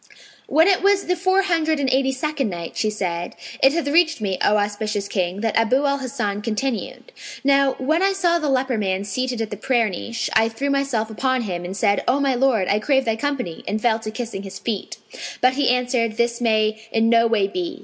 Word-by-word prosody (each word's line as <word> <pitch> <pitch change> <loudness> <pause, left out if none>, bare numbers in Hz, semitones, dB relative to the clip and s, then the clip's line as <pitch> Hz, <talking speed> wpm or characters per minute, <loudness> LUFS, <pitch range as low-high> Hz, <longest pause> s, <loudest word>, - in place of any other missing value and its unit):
When 320 +3 +4
it 385 -2 +3
was 400 0 +3
the 360 - +1
Four 375 +2 +2
Hundred 320 -4 +1
and 275 - 0
Eighty 265 0 +2
second 275 -2 -2
Night, 170 -2 -6
She 215 - 0
said, 175 -5 -3 0.3
It 270 - +6
hath 335 -3 -1
reached 320 +1 +3
me, 195 -3 -2
O 210 - +3
auspicious 205 0 -2
King, 185 -1 -2
that 225 -1 -1
Abu 250 +5 +2
al 280 0 +1
Hasan 210 -6 -3
continued: 230 - -3 0.3
"Now 275 -1 +3
when 310 +6 0
I 390 +1 +3
saw 350 -3 +1
the 305 -3 -1
leper 260 -3 0
man 190 -1 -1
seated 245 +4 -3
in 220 - -3
the 205 - -6
prayer 235 0 +1
niche, 230 +6 -4
I 225 +1 +3
threw 275 +5 -2
myself 270 -6 -1
upon 260 +2 0
him 180 -4 -4
and 185 +2 -6
said, 200 -2 +1
'O 260 +3 +3
my 275 -2 +2
lord, 245 -7 +2
I 205 - +2
crave 265 +4 +1
thy 225 -1 +1
company;' 250 - -3
and 215 - -1
fell 225 0 +1
to 220 -1 -6
kissing 220 -2 -5
his 195 -1 -8
feet. 215 -4 -4 0.4
But 255 +1 +3
he 275 -1 +1
answered, 245 -3 0
'This 235 0 0
may 220 -1 +1
in 225 0 +2
no 230 0 +4
way 215 -4 +2
be!' 350 - -4
235 Hz, 220 wpm, -21 LUFS, 210-275 Hz, 0.4 s, It